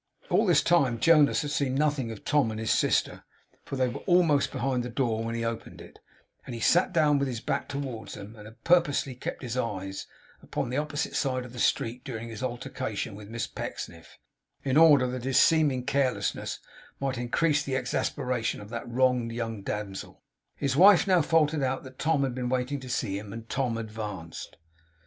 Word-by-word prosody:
All -, -, +3 dB
this -, -, +4 dB
time 135 Hz, -9 st, +3 dB
Jonas 155 Hz, 0 st, +5 dB
had 145 Hz, -, -4 dB
seen 140 Hz, -3 st, 0 dB
nothing 145 Hz, -4 st, +1 dB
of 110 Hz, -2 st, -9 dB
Tom 145 Hz, -5 st, +3 dB
and 110 Hz, 0 st, -5 dB
his 110 Hz, 0 st, 0 dB
sister; -, -, +1 dB, 0.4 s
for -, -, -6 dB
they 130 Hz, -1 st, +2 dB
were 120 Hz, -, -5 dB
almost 170 Hz, -6 st, +4 dB
behind 130 Hz, -2 st, -1 dB
the 120 Hz, -, -5 dB
door 115 Hz, -3 st, -1 dB
when 115 Hz, 0 st, -3 dB
he 115 Hz, 0 st, -2 dB
opened 115 Hz, 0 st, -5 dB
it, -, -, -13 dB, 0.4 s
and 120 Hz, -, -7 dB
he -, -, -6 dB
had -, -, 0 dB
sat 175 Hz, +2 st, +4 dB
down 150 Hz, -4 st, +3 dB
with 140 Hz, -, 0 dB
his 120 Hz, -3 st, -3 dB
back -, -, -2 dB
towards 135 Hz, -5 st, -5 dB
them, 105 Hz, +3 st, -10 dB
and 105 Hz, -1 st, -11 dB
had 115 Hz, +2 st, -16 dB
purposely 165 Hz, -6 st, +3 dB
kept 125 Hz, -, -6 dB
his 120 Hz, -1 st, -4 dB
eyes 95 Hz, -6 st, -3 dB, 0.3 s
upon -, -, -3 dB
the 130 Hz, -, -1 dB
opposite 150 Hz, +1 st, -2 dB
side 130 Hz, -3 st, 0 dB
of 125 Hz, -, -11 dB
the 125 Hz, -, -8 dB
street 120 Hz, +1 st, 0 dB
during 115 Hz, -4 st, -6 dB
his 110 Hz, 0 st, -7 dB
altercation 120 Hz, -4 st, -4 dB
with 100 Hz, 0 st, -10 dB
Miss 115 Hz, +1 st, -3 dB
Pecksniff, 85 Hz, -1 st, -7 dB, 0.5 s
in 135 Hz, -1 st, 0 dB
order 150 Hz, -4 st, +7 dB
that 125 Hz, -1 st, -4 dB
his 130 Hz, 0 st, +1 dB
seeming 145 Hz, -6 st, +4 dB
carelessness 135 Hz, -1 st, 0 dB, 0.4 s
might 135 Hz, -2 st, -2 dB
increase 150 Hz, +5 st, +1 dB
the 135 Hz, -1 st, -3 dB
exasperation 125 Hz, -2 st, -1 dB
of 105 Hz, 0 st, -10 dB
that 120 Hz, 0 st, -5 dB
wronged 125 Hz, -1 st, +2 dB
young 115 Hz, -2 st, -4 dB
damsel. 100 Hz, -1 st, -6 dB, 0.3 s
His 135 Hz, -2 st, -1 dB
wife 190 Hz, +3 st, +7 dB
now 185 Hz, -3 st, +4 dB
faltered 155 Hz, -1 st, +2 dB
out 130 Hz, 0 st, -1 dB
that 130 Hz, -1 st, -13 dB
Tom 155 Hz, -3 st, +2 dB
had 130 Hz, -2 st, -1 dB
been 125 Hz, -1 st, -3 dB
waiting 130 Hz, +2 st, -1 dB
to 130 Hz, -1 st, -9 dB
see 100 Hz, -5 st, -1 dB
him; 105 Hz, -1 st, -9 dB
and 115 Hz, +1 st, -8 dB
Tom 125 Hz, -3 st, -1 dB
advanced. 105 Hz, -7 st, -7 dB
125 Hz, 200 wpm, -28 LUFS, 115-145 Hz, 0.5 s, order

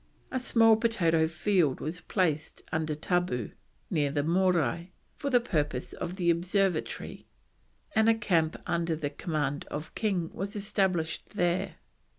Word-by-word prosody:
A 260 Hz, -, 0 dB
small 225 Hz, -3 st, +5 dB
potato 170 Hz, -9 st, +2 dB
field 170 Hz, -3 st, +1 dB
was 165 Hz, +4 st, -4 dB
placed 160 Hz, -6 st, -1 dB
under 155 Hz, -1 st, -1 dB
tabu, 155 Hz, -, -1 dB, 0.4 s
near 145 Hz, -2 st, +2 dB
the 145 Hz, 0 st, 0 dB
Morai, 175 Hz, -1 st, +1 dB, 0.2 s
for 280 Hz, -, -3 dB
the 250 Hz, -2 st, +5 dB
purpose 150 Hz, -, -2 dB
of 175 Hz, +1 st, -5 dB
the 175 Hz, -3 st, +3 dB
observatory, 180 Hz, 0 st, -1 dB, 0.7 s
and 220 Hz, 0 st, +4 dB
a 225 Hz, -, +5 dB
camp 170 Hz, -7 st, +1 dB
under 170 Hz, -1 st, 0 dB
the 150 Hz, -2 st, -3 dB
command 145 Hz, -2 st, -2 dB
of 150 Hz, +1 st, -6 dB
King 185 Hz, -7 st, -1 dB
was 200 Hz, +4 st, -4 dB
established 190 Hz, -6 st, -1 dB
there. 175 Hz, -2 st, 0 dB
175 Hz, 140 wpm, -29 LUFS, 155-195 Hz, 0.7 s, small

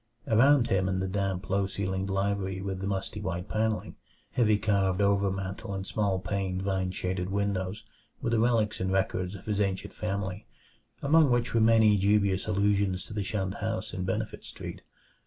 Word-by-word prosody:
Around 125 Hz, +3 st, +5 dB
him 95 Hz, -2 st, +2 dB
in 95 Hz, 0 st, 0 dB
the 95 Hz, -, -1 dB
damp, 95 Hz, -1 st, -2 dB
low 100 Hz, 0 st, +1 dB
ceiled 95 Hz, 0 st, -2 dB
library 95 Hz, -1 st, -1 dB
with 95 Hz, -1 st, -4 dB
the 95 Hz, -, -3 dB
musty 100 Hz, +1 st, -3 dB
white 90 Hz, -3 st, -3 dB
panelling, 110 Hz, 0 st, -1 dB, 0.3 s
heavy 110 Hz, -4 st, +3 dB
carved 100 Hz, -3 st, +1 dB
overmantel 100 Hz, -1 st, 0 dB
and 95 Hz, 0 st, -4 dB
small 100 Hz, -2 st, 0 dB
paned, 95 Hz, -1 st, -2 dB
vine 95 Hz, -1 st, 0 dB
shaded 90 Hz, 0 st, -2 dB
windows, 100 Hz, 0 st, -1 dB, 0.4 s
were 115 Hz, -, -2 dB
the 115 Hz, -, +3 dB
relics 115 Hz, -2 st, +2 dB
and 95 Hz, 0 st, -1 dB
records 95 Hz, 0 st, 0 dB
of 95 Hz, -, -11 dB
his 105 Hz, -1 st, 0 dB
ancient 95 Hz, -2 st, -2 dB
family, 100 Hz, -1 st, -3 dB, 0.6 s
among 155 Hz, +1 st, +5 dB
which 120 Hz, -1 st, +1 dB
were 115 Hz, -, +3 dB
many 110 Hz, -2 st, +5 dB
dubious 100 Hz, 0 st, +2 dB
allusions 100 Hz, -2 st, +1 dB
to -, -, -9 dB
the 105 Hz, -1 st, -1 dB
shunned 95 Hz, -1 st, -2 dB
house 110 Hz, -2 st, -3 dB
in 95 Hz, -, -3 dB
Benefit 105 Hz, +4 st, -3 dB
Street. -, -, -8 dB
100 Hz, 175 wpm, -29 LUFS, 95-105 Hz, 0.6 s, Around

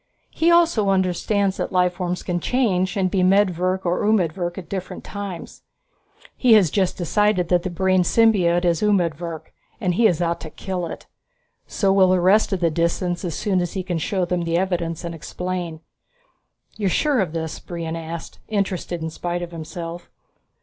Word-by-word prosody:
He 330 Hz, -, +2 dB
also 335 Hz, -12 st, +4 dB
understands 190 Hz, +1 st, +1 dB
that -, -, -3 dB
life 180 Hz, -1 st, +2 dB
forms 180 Hz, 0 st, -3 dB
can 175 Hz, -1 st, -1 dB
change, 190 Hz, -6 st, 0 dB
and 185 Hz, -2 st, +1 dB
be 190 Hz, -, +1 dB
medvirk 185 Hz, -1 st, +2 dB
or 175 Hz, +1 st, 0 dB
umedvirk 175 Hz, -4 st, 0 dB
at 180 Hz, -4 st, -7 dB
different 185 Hz, 0 st, -5 dB
times. 200 Hz, -4 st, -7 dB, 0.7 s
He 245 Hz, -3 st, +4 dB
has 195 Hz, -8 st, +5 dB
just 190 Hz, -3 st, 0 dB
decided 185 Hz, 0 st, +1 dB
that 180 Hz, -1 st, +3 dB
the 185 Hz, -, -3 dB
brain 185 Hz, +1 st, +2 dB
symbiote 180 Hz, -3 st, +3 dB
is 170 Hz, -2 st, +2 dB
umedvirk 170 Hz, -5 st, -1 dB, 0.3 s
and 185 Hz, -6 st, 0 dB
he 225 Hz, +5 st, +4 dB
is 175 Hz, -5 st, 0 dB
out 170 Hz, -1 st, 0 dB
to 160 Hz, -, -7 dB
kill 180 Hz, +1 st, -4 dB
it. -, -, -8 dB, 0.6 s
So 195 Hz, -2 st, +1 dB
will 190 Hz, -1 st, +5 dB
the 185 Hz, 0 st, +3 dB
rest 195 Hz, +6 st, +4 dB
of 190 Hz, -2 st, -1 dB
the 165 Hz, -1 st, +2 dB
Disans 175 Hz, +2 st, -1 dB
as 170 Hz, -4 st, -3 dB
soon 195 Hz, -4 st, 0 dB
as 175 Hz, -, -3 dB
he 190 Hz, -, -3 dB
can 175 Hz, -3 st, -2 dB
show 185 Hz, +2 st, -1 dB
them 180 Hz, 0 st, -1 dB
the 170 Hz, 0 st, 0 dB
evidence 175 Hz, -2 st, -1 dB
and 170 Hz, 0 st, -4 dB
explain." 175 Hz, 0 st, -5 dB, 1.0 s
"You're 205 Hz, -3 st, 0 dB
sure 285 Hz, -, +2 dB
of 185 Hz, -6 st, -1 dB
this?" 160 Hz, -1 st, -4 dB
Brion 165 Hz, -2 st, -5 dB
asked, 165 Hz, 0 st, -7 dB
interested 190 Hz, -5 st, -2 dB
in 160 Hz, -, -3 dB
spite 175 Hz, +2 st, -3 dB
of 175 Hz, -, -7 dB
himself. 170 Hz, +1 st, -7 dB
180 Hz, 180 wpm, -22 LUFS, 170-195 Hz, 1.0 s, has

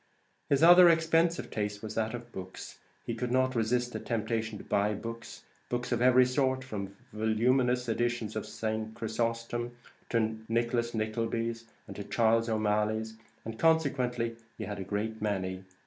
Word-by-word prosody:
His 140 Hz, +2 st, +3 dB
other 175 Hz, +1 st, +9 dB
expensive 165 Hz, +1 st, +2 dB
taste 105 Hz, -1 st, -3 dB
was 110 Hz, 0 st, -5 dB
that 110 Hz, +1 st, -1 dB
of 120 Hz, 0 st, -9 dB
books; 95 Hz, -2 st, -8 dB, 0.3 s
he -, -, -2 dB
could 125 Hz, -1 st, -3 dB
not 130 Hz, 0 st, +2 dB
resist 120 Hz, +1 st, 0 dB
the -, -, -3 dB
temptation 110 Hz, -1 st, -2 dB
to -, -, -10 dB
buy 105 Hz, +1 st, +1 dB
books, 115 Hz, +2 st, -7 dB, 0.3 s
books 120 Hz, 0 st, -2 dB
of 120 Hz, -1 st, +1 dB
every 125 Hz, 0 st, +6 dB
sort, 130 Hz, 0 st, +1 dB
from 100 Hz, -6 st, -6 dB, 0.2 s
voluminous 125 Hz, +3 st, +2 dB
editions 120 Hz, -1 st, -1 dB
of 110 Hz, -, -3 dB
St. 110 Hz, 0 st, -3 dB
Chrysostom 115 Hz, +1 st, -2 dB, 0.3 s
to 110 Hz, -1 st, 0 dB
Nicholas 115 Hz, 0 st, 0 dB
Nicklebys 115 Hz, +1 st, -2 dB, 0.2 s
and 100 Hz, -, -8 dB
Charles 115 Hz, 0 st, +3 dB
O'Malleys; 110 Hz, 0 st, 0 dB, 0.3 s
and 110 Hz, 0 st, -6 dB
consequently 130 Hz, -8 st, +2 dB, 0.2 s
he -, -, -5 dB
had 105 Hz, -1 st, -5 dB
a -, -, -3 dB
great 105 Hz, +3 st, -3 dB
many. 95 Hz, -3 st, -2 dB
115 Hz, 150 wpm, -30 LUFS, 110-125 Hz, 0.3 s, other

